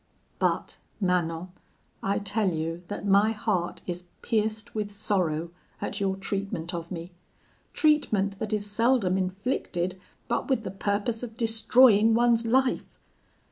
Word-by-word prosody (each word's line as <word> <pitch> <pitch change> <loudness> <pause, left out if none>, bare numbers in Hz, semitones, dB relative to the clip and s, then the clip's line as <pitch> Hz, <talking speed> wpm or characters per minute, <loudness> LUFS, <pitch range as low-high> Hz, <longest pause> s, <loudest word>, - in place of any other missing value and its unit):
But, - - 0 0.2
Manon, 180 -2 0 0.5
I 195 +1 0
tell 205 0 0
you 165 0 -3
that 205 - -5
my 205 +2 +4
heart 205 -5 -2
is 175 0 -4 0.2
pierced 220 0 -1
with 210 -2 -2
sorrow 180 -6 -1 0.3
at 200 - -3
your 195 -1 0
treatment 195 -3 -3
of 170 -1 -5
me 170 0 -6 0.6
treatment 210 -11 +2
that 220 -1 -3
is 210 -1 0
seldom 210 -2 +2
inflicted 185 -2 -2 0.3
but - - -1
with 260 -4 +1
the - - -4
purpose 205 +4 -1
of 225 -2 -7
destroying 225 -1 +5
one's 235 -1 +3
life. 260 +2 +1
205 Hz, 135 wpm, -27 LUFS, 185-225 Hz, 0.6 s, destroying